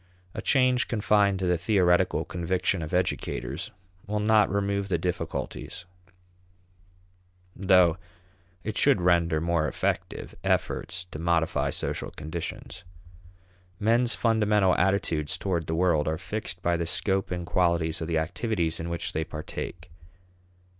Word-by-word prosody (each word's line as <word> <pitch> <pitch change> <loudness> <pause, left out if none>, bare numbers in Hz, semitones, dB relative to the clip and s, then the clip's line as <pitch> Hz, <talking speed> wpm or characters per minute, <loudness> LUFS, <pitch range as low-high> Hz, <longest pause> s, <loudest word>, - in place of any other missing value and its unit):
A - - -5
change 130 -2 +3
confined 105 -3 +2
to 95 - -2
the 90 -2 +1
theoretical 90 -1 +2
conviction 90 +1 -1
of 80 - -5
educators 90 -3 -2 0.4
will 105 +1 -1
not 105 0 +4
remove 100 0 -1
the 90 - +2
difficulties, 90 +1 -4 1.7
though 90 -2 +4 0.7
it 110 0 -4
should 140 -7 +4
render 85 -3 +3
more 85 -1 +1
effective - - -3
efforts 90 - -1
to 75 - -6
modify 85 -1 +1
social - - -3
conditions. 80 +2 -6 1.0
Men's 115 +3 +3
fundamental 105 -4 +3
attitudes 90 -5 +1
toward 85 -5 -2
the 80 - -1
world 85 -3 +2
are 80 0 0
fixed 95 -2 -5
by 85 0 +2
the 85 -1 -2
scope 95 +2 0
and 90 -1 -3
qualities 85 -2 +1
of 80 - -3
the 85 -1 0
activities 85 0 -1
in 85 +1 -4
which 85 0 -3
they 80 - 0
partake. 80 +2 -7
90 Hz, 130 wpm, -27 LUFS, 85-100 Hz, 1.7 s, not